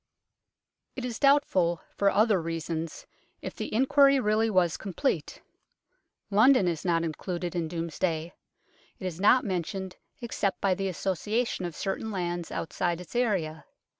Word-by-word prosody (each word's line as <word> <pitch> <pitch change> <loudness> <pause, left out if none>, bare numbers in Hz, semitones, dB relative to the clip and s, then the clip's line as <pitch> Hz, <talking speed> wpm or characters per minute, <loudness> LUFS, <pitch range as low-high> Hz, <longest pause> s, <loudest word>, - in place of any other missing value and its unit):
It 255 - -4
is 240 -2 -4
doubtful, 190 - +3
for 200 - +3
other 210 -2 +3
reasons, 165 0 -4 0.4
if - - -5
the - - -5
inquiry 275 +3 +5
really 220 0 +2
was 180 -5 +2
complete. 210 +8 -2 0.9
London 215 0 +5
is 165 -3 -2
not 170 -2 +1
included 175 +2 -4
in 170 -2 -1
Domesday; 165 0 -2 0.6
it - - -8
is 175 -2 -4
not 245 +5 +5
mentioned 190 0 -3 0.2
except 215 -5 -2
by 195 -2 +2
the 195 +1 -2
association 195 +4 -1
of 170 -3 -5
certain 195 +3 -3
lands 175 -4 -3
outside 175 +1 -2
its 180 +6 -11
area. 185 -10 0
185 Hz, 135 wpm, -28 LUFS, 170-220 Hz, 0.9 s, inquiry